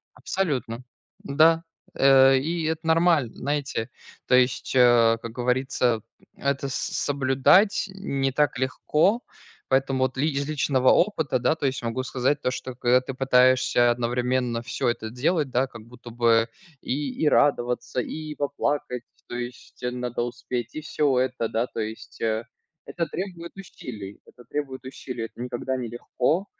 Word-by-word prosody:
Абсолютно, 130 -10 -2 0.4
да, 160 +3 +4 0.3
э, 135 0 +6
и 165 +5 -1
это 160 0 -2
нормально, 160 -6 +3
знаете, 140 -4 -2 0.4
то 125 - +5
есть, 125 0 +2
э, 120 -2 +5
как 115 - -6
говорится, 125 -1 0 0.3
это 140 0 -1
с 135 - -5
соблюдать 140 +10 +2
не 135 -9 -1
так 145 -1 +1
легко. 150 - +1 0.5
Поэтому 135 0 +1
вот 130 0 -1
ли 145 +4 +1
из 140 -1 -2
личного 135 -3 +2
опыта, 160 -9 +2
да, 155 - +2
то 155 - -4
есть 130 -1 -1
могу 115 +2 -2
сказать 130 +3 0
то, 125 - 0
что 130 0 -6
когда 125 +1 +3
ты 130 +1 -6
пытаешься 130 -2 +4
одновременно 125 0 0
всё 130 0 -1
это 115 -2 -3
делать, 145 +3 0
да, 130 +2 +1
как 115 -3 -11
будто 120 0 -12
бы 115 -1 +3 0.3
и 140 +1 -2
и 150 - +5
радоваться, 125 -3 +1
и 155 +4 -6
поплакать. 140 -3 -2 0.3
То - - -5
есть, 120 0 -8
э, 125 - -1
надо 125 -1 -3
успеть 120 -1 -5
и - - -3
всё 150 -3 +1
это, 125 -2 0
да, 115 +2 +1
то - - -7
есть, 110 0 -6
э, 110 0 0 0.4
это 170 - -2
требует 175 -3 -6
усилий 110 - -9
это 120 - -17
требует 140 -3 -4
усилий, 125 -3 -6
это 115 - -11
никогда 125 +1 -3
не 125 -2 -4
легко. 125 - -1
130 Hz, 155 wpm, -25 LUFS, 120-145 Hz, 0.5 s, э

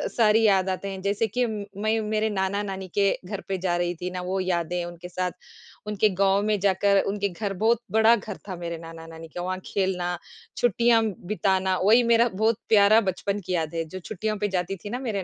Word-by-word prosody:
सारी 225 -1 +4
याद 190 -3 +3
आते 190 +1 -3
हैं, 190 -1 -6
जैसे 205 +3 0
कि 245 +4 0
मैं 215 0 -2
मेरे 215 0 +1
नाना-नानी 195 -1 -2
के 200 -1 +4 0.2
घर 200 +1 -5
पे 195 - -1
जा 180 -1 -1
रही 175 0 -1
थी 180 +2 -5
ना, 180 - -4
वो 185 +2 -2
यादें 175 -1 -1
उनके 175 0 -9
साथ, 180 0 -2 0.6
उनके 210 0 +2
गाँव 195 0 +4
में 210 -1 +1
जाकर 200 +1 +3
उनके 200 0 -1
घर 195 +3 -4
बहुत 220 +4 +2
बड़ा 220 +2 +5
घर 210 -2 -7
था 185 - -3
मेरे 170 -1 -5
नाना-नानी 165 0 -10
का, 175 +3 -7
वहाँ 185 +1 -3
खेलना, 180 -3 -1 0.4
छुट्टियाँ 235 -1 +3 0.2
बिताना, 190 -2 +1
वही 225 +5 +6
मेरा 235 0 +4
बहुत 220 +3 +1
प्यारा 215 +1 +6
बचपन 200 +1 -2
की 185 - -2
याद 160 -2 -1
है, 165 - 0
जो 185 +4 -8
छुट्टियों 215 +3 -3
पे 205 0 0
जाती 180 +2 -2
थी - - -4
ना 245 +4 -3
मेरे 220 -7 -3
195 Hz, 205 wpm, -25 LUFS, 180-215 Hz, 0.6 s, वही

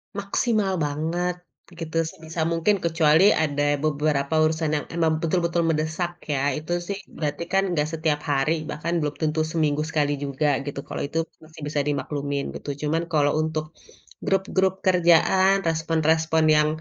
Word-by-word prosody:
Maksimal 200 -2 0
banget 165 +4 -1 0.3
gitu. 165 -1 -4
Sebisa 160 0 -4
mungkin 170 +4 +1
kecuali 165 +3 +4
ada 145 -1 +1
beberapa 150 0 0
urusan 155 0 +1
yang 150 -1 -1
emang 160 -2 0
betul-betul 170 0 0
mendesak 160 +3 -1
ya. 140 -2 0
Itu 175 +3 -2
sih 195 +3 -4 0.2
berarti 150 +1 -3
kan 195 0 +3
enggak 150 +1 0
setiap 155 -2 -1
hari, 150 +2 0
bahkan 160 +2 -2
belum 150 0 -2
tentu 155 0 0
seminggu 155 -2 0
sekali 150 -2 0
juga, 140 0 -1
gitu. 140 -1 -5
Kalo - - -4
itu 145 +3 -4
aku - - -40
masih 155 0 -14
bisa 145 0 -1
dimaklumin 145 0 -3
gitu. - - -7 0.2
Cuman 165 +2 0
kalo 145 -1 +2
untuk 155 0 -2 0.4
grup-grup 190 0 0
kerjaan, 185 +2 +4
respon-respon 160 0 +1
yang 150 0 +4
160 Hz, 150 wpm, -24 LUFS, 150-170 Hz, 0.4 s, kecuali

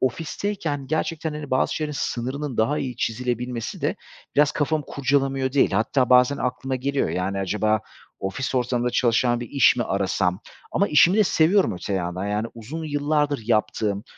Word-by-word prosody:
ofisteyken 150 - -2
gerçekten 160 +1 -2
hani 150 -2 -7
bazı 130 - +1
şeylerin 150 -1 -3
sınırının 130 +2 -3
daha 130 +7 +1
iyi 125 -3 -4
çizilebilmesi 120 0 -3
de - - -1 0.4
biraz 150 0 +4
kafamı 150 0 0
kurcalamıyor 135 -1 0
değil. 140 - +3
Hatta 125 +5 +1
bazen 125 +3 +5
aklıma 130 +1 -2
geliyor, 135 +2 -1
yani, 95 +2 -2
acaba 105 +2 +1 0.4
ofis 100 +8 -3
ortamında 125 -1 0
çalışan 120 0 +2
bir 120 - -6
iş 140 -3 +4
mi 120 - +1
arasam 95 0 0 0.3
ama 200 - +2
işimi 170 +6 +5
de 210 - +6
seviyorum 180 - +3
öte 90 +3 -5
yandan 90 +1 -2
yani, 105 +2 -1
uzun 140 +9 -7
yıllardır 145 -2 0
yaptığım, 105 -1 0
130 Hz, 155 wpm, -24 LUFS, 110-145 Hz, 0.4 s, de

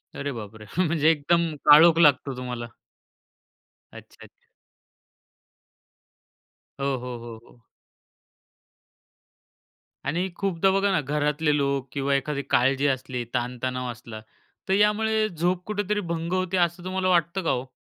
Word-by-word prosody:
अरे 140 0 -3
बापरे! 110 -2 -9
म्हणजे 160 -3 +2
एकदम 165 +1 +1
काळोख 160 +3 +8
लागतो 140 -4 +4
तुम्हाला. 125 -2 -5 1.2
अच्छा, - - -14
अच्छा. - - -25 2.3
हो, 140 - -2
हो, 125 -1 -6
हो, 115 -1 -9
हो. 120 - -21 2.5
आणि 175 +6 -1
खूपदा 195 -1 +1
बघा 195 +1 +2
ना 185 - +2
घरातले 150 +1 0
लोक 140 -1 -1
किंवा 140 0 0
एखादी 140 +1 -2
काळजी 135 +3 +2
असली 130 -2 -2
ताण 125 0 -2
तणाव 125 -1 -2
असला, 110 -1 -10 0.5
तर 190 - +3
यामुळे 215 +1 +2
झोप 175 +2 -1
कुठेतरी 210 0 -1
भंग 165 +1 -3
होते 185 0 0
असं 175 0 0
तुम्हाला 185 0 -1
वाटतं 175 +1 +1
का - - 0
हो? 130 +1 -3
150 Hz, 125 wpm, -25 LUFS, 130-180 Hz, 2.5 s, काळोख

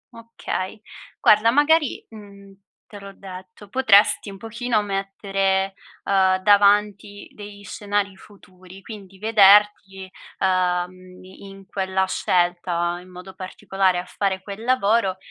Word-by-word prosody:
Okay. 225 -3 -6 0.4
Guarda, 215 +2 +4
magari, 295 +3 +1
mhmm, 200 -2 -14 0.3
te 205 - -12
l'ho 200 0 -11
detto, 185 +1 -12
potresti 215 -4 +3
un 195 - -10
pochino 225 +1 -2
mettere, 195 -1 -2 0.3
uhm, 190 -1 +2
davanti 205 0 +2
degli 205 -1 -12
scenari 205 -3 -3
futuri, 190 -1 -17
quindi 195 -4 -12
vederti, 205 -2 +3 0.3
uhm, 185 0 -2
in 195 +1 -14
quella 190 0 -2
scelta, 175 -1 -1
in 185 - -17
modo 180 +1 -12
particolare, 190 0 -2
a 180 - -4
fare 190 0 -3
quel 205 +2 -9
lavoro, 230 -5 +1
195 Hz, 115 wpm, -21 LUFS, 185-210 Hz, 0.4 s, Guarda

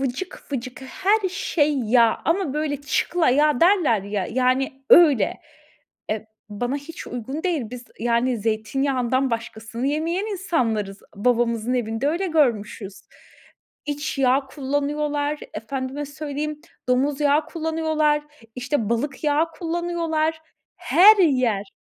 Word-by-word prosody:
vıcık 270 +5 -5
vıcık 255 0 -5
her 385 +8 +1
şey 305 -6 0
yağ 230 -1 +3
ama 330 -4 0
böyle 300 -1 -1
çıkla 315 +1 +1
yağ 295 0 +3
derler 335 - +4
ya, 200 -2 -3
yani, 260 +3 0
öyle. 290 - +6 0.7
Eee, 215 0 -3 0.2
bana 245 +6 -2
hiç 315 +4 -9
uygun 260 +6 -5
değil. 350 -6 0
Biz, 250 0 -8 0.2
yani, 240 +2 +1
zeytinyağından 255 +4 0
başkasını 230 +2 -4
yemeyen 330 +7 -1
insanlarız. 230 - -1
Babamızın 235 +1 +1
evinde 230 +1 -1
öyle 345 +6 0
görmüşüz. 235 - 0 0.8
İç 295 0 -3
yağ 270 +1 +3
kullanıyorlar 290 +1 -2
efendime 260 +5 -4
söyleyeyim, 295 +1 -5 0.3
domuz 275 +3 +1
yağı 295 +1 +3
kullanıyorlar, 315 -2 0 0.3
işte, 250 -3 -1
balık 270 +7 -2
yağı 305 +3 +2
kullanıyorlar. 330 -2 -2 0.4
Her 420 +5 +6
yer 255 - +2
280 Hz, 115 wpm, -23 LUFS, 240-310 Hz, 0.8 s, öyle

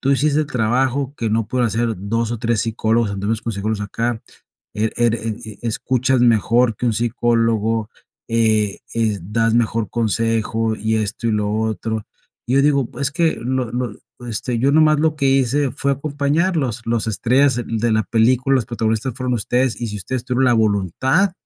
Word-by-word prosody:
"Tú 135 +1 +2
hiciste 145 +2 +2
el 155 - -1
trabajo 130 +2 0
que 115 - -2
no 110 -1 0
pudo 125 +1 0
hacer 115 +1 0
2 115 +4 -2
o 120 - -4
3 115 -1 0
psicólogos, 115 -1 0
algunos 100 +3 -2
consejeros 110 -1 -2
de 105 - -3
acá, 115 +2 -2 0.5
eh, 110 +1 0
ere 115 -1 +1
eh 110 - -3
eh, 110 -2 -9
escuchas 130 +3 0
mejor 120 0 +3
que 125 - -2
un 115 - +2
psicólogo, 115 -1 0 0.4
eh 110 -3 +2 0.2
eh, 110 -3 0
das 115 +5 0
mejor 115 -2 0
consejo 115 0 0
y 110 +1 -1
esto, 110 +2 -2
y - - +1
lo 105 -1 0
otro". 110 0 -2 0.4
Yo 135 +2 +3
digo: 140 -4 +2
"Es 140 0 +1
que 165 +2 +1
lo 130 -1 -2
lo, 120 -3 -3 0.3
este, 120 +2 -2
yo 135 +3 +3
nomás 155 -1 +4
lo 155 -1 +1
que 140 -2 0
hice 135 +1 +2
fue 140 - 0
acompañarlos, 145 - -1
los 115 -1 0
estrellas 125 +5 +2
de 115 0 0
la 110 -1 +1
película, 125 +5 +2
los 125 - 0
protagonistas 115 +1 -1
fueron 125 -1 -1
ustedes, 125 +2 0
y 120 - -2
si 105 - -5
ustedes 120 +5 -4
tuvieron 125 0 +1
la 125 - +4
voluntad 110 - +1
115 Hz, 180 wpm, -20 LUFS, 110-130 Hz, 0.5 s, nomás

